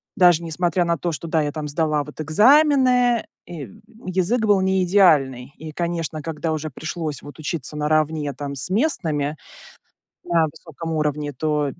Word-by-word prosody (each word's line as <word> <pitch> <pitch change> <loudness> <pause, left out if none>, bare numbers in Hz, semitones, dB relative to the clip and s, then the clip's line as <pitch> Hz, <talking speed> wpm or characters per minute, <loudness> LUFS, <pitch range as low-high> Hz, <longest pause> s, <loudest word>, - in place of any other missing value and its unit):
даже 175 -4 +5
несмотря 175 +2 0
на 170 0 +1
то, 170 0 -2
что 165 +2 -6
да, 160 -1 +1
я 145 - -2
там 150 -1 -5
сдала 150 0 0
вот 150 - -13
экзамены, 250 - +4 0.2
и 145 - -9 0.3
язык 190 +6 +1
был 205 -2 +4
не 190 0 +2
идеальный. 145 -9 +3
И, 155 0 -8
конечно, 165 -2 -3
когда 160 0 -3
уже 155 0 -3
пришлось 155 0 -5
вот 145 - -11
учиться 150 -1 -4
наравне 150 -1 0
там 140 +1 -6
с 130 - -1
местными, 155 - 0 0.9
на 165 -2 +3
высоком 165 0 -8
уровне, 150 -1 -1
то 150 0 -1
160 Hz, 160 wpm, -22 LUFS, 150-180 Hz, 0.9 s, даже